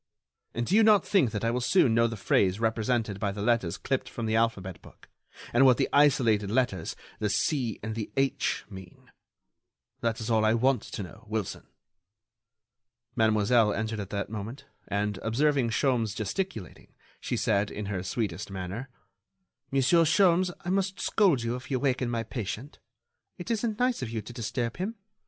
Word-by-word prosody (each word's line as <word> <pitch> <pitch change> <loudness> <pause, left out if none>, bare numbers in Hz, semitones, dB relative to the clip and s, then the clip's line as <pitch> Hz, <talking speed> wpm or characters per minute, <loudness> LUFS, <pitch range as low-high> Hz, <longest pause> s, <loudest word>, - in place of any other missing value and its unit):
And 120 - -1
do 190 - +1
you 225 - +7
not 215 -4 +5
think 185 - +3
that 110 0 -3
I 115 - +2
will 125 +1 -1
soon 125 -2 +3
know 115 +1 +4
the 115 -1 -5
phrase 100 0 +2
represented 110 -2 0
by 100 0 -1
the 100 0 -5
letters 105 -7 +1
clipped 135 -1 -2
from 115 - -5
the 110 0 0
alphabet 100 -5 -1
book, - - -17 0.5
and 120 +3 +5
what 130 -2 +6
the - - +1
isolated 125 -8 +4
letters—the 105 -2 -2
'C' 125 -1 0
and 110 +1 -3
the 110 -1 -5
'H'—mean? 100 -8 -3 0.9
That 115 -1 -1
is 110 +1 -3
all 110 -1 +3
I 110 +1 +3
want 125 0 +2
to 105 - -6
know, 110 +6 -12
Wilson." 110 -3 -4 1.5
Mademoiselle 110 0 +3
entered 110 0 -3
at 100 -2 -5
that 100 +1 -4
moment, 115 +6 -6 0.2
and, 105 0 -1
observing 135 +2 +1
Sholmes 115 -3 +1
gesticulating, 110 - -5 0.2
she - - -3
said, 100 -1 +1
in 105 - -5
her 100 -2 -3
sweetest 100 +1 -3
manner: 100 +7 -5 0.8
"Monsieur 140 +5 +4
Sholmes, 180 +2 +4 0.2
I 180 - -1
must 190 0 0
scold 180 - +2
you 115 +1 -1
if 125 - -9
you 130 -2 0
waken 130 -2 0
my 115 -1 -1
patient. 115 +4 -6 0.6
It 180 +5 -5
isn't 220 -1 -1
nice 250 0 +1
of 125 - -3
you 110 -2 -4
to 120 - -10
disturb 115 0 -3
him. 200 +6 -3
115 Hz, 170 wpm, -28 LUFS, 105-135 Hz, 1.5 s, you